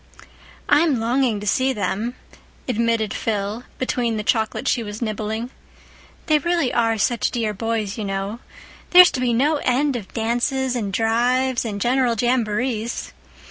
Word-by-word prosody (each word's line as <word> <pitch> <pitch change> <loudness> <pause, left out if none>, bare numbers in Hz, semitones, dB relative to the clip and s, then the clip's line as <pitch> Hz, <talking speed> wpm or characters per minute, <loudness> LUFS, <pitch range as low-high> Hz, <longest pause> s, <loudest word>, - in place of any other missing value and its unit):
"I'm 295 -3 +3
longing 235 -1 +1
to - - -6
see 260 +6 +1
them," 210 +3 -2 0.5
admitted 230 -3 0
Phil, 210 +2 -3
between 240 -3 -1
the 210 - -3
chocolate 220 +3 0
she 245 - +2
was 210 -1 -6
nibbling. 220 +1 -3 0.7
"They 305 -2 +3
really 335 -4 0
are 225 -1 +2
such 235 +2 +1
dear 225 -4 -2
boys, 220 0 -3
you - - -2
know. 195 +3 -3 0.5
There's 360 0 +8
to 260 - -3
be 250 -1 +1
no 285 +7 +2
end 275 +1 +1
of 210 -6 -6
dances 245 +3 0
and 210 -5 -2
drives 245 +4 +1
and 205 -3 -4
general 245 +1 +2
jamborees. 235 -1 -1
235 Hz, 145 wpm, -22 LUFS, 215-255 Hz, 0.7 s, There's